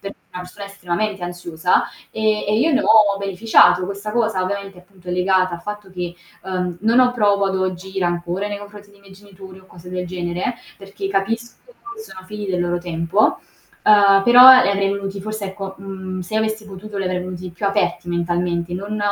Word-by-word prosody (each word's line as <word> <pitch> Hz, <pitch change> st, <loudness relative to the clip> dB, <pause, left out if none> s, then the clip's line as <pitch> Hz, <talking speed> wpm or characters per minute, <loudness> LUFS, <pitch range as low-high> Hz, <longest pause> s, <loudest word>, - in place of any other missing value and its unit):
perché 200 Hz, 0 st, -8 dB
è -, -, -42 dB
una 180 Hz, -, -5 dB
persona 190 Hz, +3 st, -10 dB
estremamente 200 Hz, 0 st, -3 dB
ansiosa 175 Hz, -1 st, 0 dB, 0.3 s
e 215 Hz, -1 st, 0 dB
e 215 Hz, +1 st, +2 dB
io 315 Hz, +5 st, +2 dB
ne 275 Hz, -, +3 dB
ho 210 Hz, -6 st, +4 dB
beneficiato. 195 Hz, -2 st, +3 dB
Questa 200 Hz, +2 st, -5 dB
cosa 220 Hz, -5 st, 0 dB
ovviamente, 195 Hz, 0 st, -5 dB
appunto 180 Hz, 0 st, -17 dB
è -, -, -2 dB
legata 185 Hz, 0 st, +2 dB
al 170 Hz, -, -9 dB
fatto 210 Hz, -1 st, -8 dB
che, 175 Hz, -1 st, -5 dB, 0.3 s
uhm, 180 Hz, -2 st, -3 dB
non 230 Hz, +4 st, +4 dB
ho 250 Hz, -1 st, +4 dB
provo 205 Hz, -4 st, +2 dB
ad 190 Hz, -, -1 dB
oggi 190 Hz, +1 st, -3 dB
rancore 175 Hz, +2 st, -2 dB
nei 205 Hz, -, -4 dB
confronti 205 Hz, 0 st, -12 dB
dei 200 Hz, 0 st, -22 dB
miei 195 Hz, -1 st, -17 dB
genitori, 190 Hz, -1 st, -14 dB
o 190 Hz, -, -20 dB
cose 180 Hz, 0 st, -13 dB
del 180 Hz, 0 st, -4 dB
genere, 175 Hz, +5 st, -3 dB, 0.2 s
perché 195 Hz, 0 st, -7 dB
capisco 225 Hz, +5 st, -2 dB
che 415 Hz, -4 st, -12 dB
sono 185 Hz, -, -11 dB
figli 210 Hz, 0 st, -6 dB
del 180 Hz, -1 st, -1 dB
loro 175 Hz, 0 st, -1 dB
tempo, 175 Hz, +4 st, 0 dB, 0.4 s
uhm, 200 Hz, -2 st, +6 dB
però 255 Hz, +2 st, +9 dB
li 200 Hz, -, +1 dB
avrei 195 Hz, 0 st, +1 dB
venuti 200 Hz, 0 st, -5 dB
forse 215 Hz, +1 st, -5 dB
ecco, 195 Hz, 0 st, -7 dB
mhmm, 190 Hz, -1 st, -6 dB
se 180 Hz, +4 st, -7 dB
avessi 220 Hz, 0 st, -1 dB
potuto 200 Hz, +1 st, -9 dB
li 195 Hz, -, -2 dB
avrei 185 Hz, 0 st, -1 dB
venuti 180 Hz, 0 st, -6 dB
più 175 Hz, +4 st, -4 dB
aperti 185 Hz, -3 st, -1 dB
mentalmente, 175 Hz, 0 st, -1 dB
non 205 Hz, +3 st, -4 dB
195 Hz, 200 wpm, -20 LUFS, 180-210 Hz, 0.4 s, però